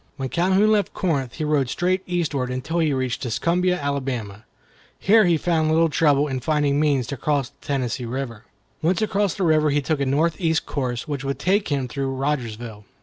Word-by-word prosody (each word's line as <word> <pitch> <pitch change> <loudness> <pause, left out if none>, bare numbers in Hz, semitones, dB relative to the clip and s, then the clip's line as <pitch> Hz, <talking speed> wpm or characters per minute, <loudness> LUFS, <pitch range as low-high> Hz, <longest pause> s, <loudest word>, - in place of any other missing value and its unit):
When 135 -2 -3
Calhoun 190 +6 +3
left 210 -2 +1
Corinth, 140 -9 -1
he 160 - -3
rode 150 -4 +1
straight 185 +4 0
eastward, 155 -8 -1
until 130 +7 -2
he 160 -2 +2
reached 130 -2 -2
Tuscumbia, 175 +9 0
Alabama. 130 -7 -3 0.5
Here 215 +2 +5
he 170 -2 +3
found 160 -1 +1
little 165 +1 +3
trouble 150 -1 +3
in 130 -2 -2
finding 145 +1 +1
means 145 -5 +2
to 140 +4 -5
cross 140 -1 0
the 140 - -21
Tennessee 125 -3 -1
River. 120 -2 -5 0.4
Once 180 +7 +1
across 205 -3 0
the 195 - -2
river 155 -2 +3
he 145 +1 +2
took 150 +1 -1
a - - +1
northeast 160 +3 +1
course, 125 -4 -3
which 145 -3 -3
would 140 0 -2
take 200 +3 +1
him 140 -3 -1
through 135 +1 -3
Rogersville. 120 -6 -3
145 Hz, 190 wpm, -23 LUFS, 130-170 Hz, 0.5 s, Here